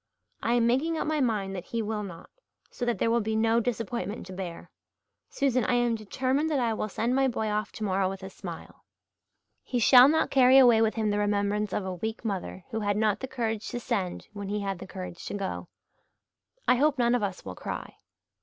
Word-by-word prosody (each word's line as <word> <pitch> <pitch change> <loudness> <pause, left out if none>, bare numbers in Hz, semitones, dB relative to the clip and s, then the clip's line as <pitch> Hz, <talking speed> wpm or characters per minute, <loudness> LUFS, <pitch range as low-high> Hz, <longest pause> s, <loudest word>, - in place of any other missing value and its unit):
I 235 - +1
am 235 -1 +3
making 285 +8 +1
up - - -1
my 310 0 0
mind 205 -6 0
that 180 -1 -6
he 230 -1 -2
will 215 0 -2
not, 180 -5 -9 0.4
so 245 - -4
that 240 -1 0
there 230 - +1
will 235 0 +3
be 220 +1 -2
no 225 +1 +3
disappointment 230 -3 -3
to 185 - -9
bear. 180 -3 -7 0.6
Susan, 260 -3 +1
I 245 - +1
am 240 -1 +2
determined 260 +7 -1
that 295 -3 +1
I 235 -2 +1
will 215 0 -3
send 235 +5 -1
my 270 0 +3
boy 220 -3 -1
off 210 -1 -1
tomorrow 195 -3 0
with 195 0 -7
a 190 - -6
smile. - - -9 0.8
He 250 - -3
shall 245 +2 +8
not 320 +2 +2
carry 260 -1 +6
away 240 -4 +7
with 220 -1 +2
him 215 -2 0
the 205 - 0
remembrance 205 0 0
of 195 - -2
a 190 - -3
weak 220 +6 -5
mother 190 -3 -4
who 220 - -2
had 205 -1 0
not 215 -1 +2
the 265 - -4
courage 225 -4 -3
to 240 - -4
send 185 -6 -3
when 200 -1 -6
he 210 0 -1
had 195 -2 -3
the - - -8
courage 185 -3 -7
to - - -4
go. 195 -2 -4 1.0
I - - +5
hope 295 +2 +3
none 240 -1 +3
of 245 - +2
us 200 -2 -3
will 95 - -5
cry." - - -6
220 Hz, 220 wpm, -28 LUFS, 200-245 Hz, 1.0 s, shall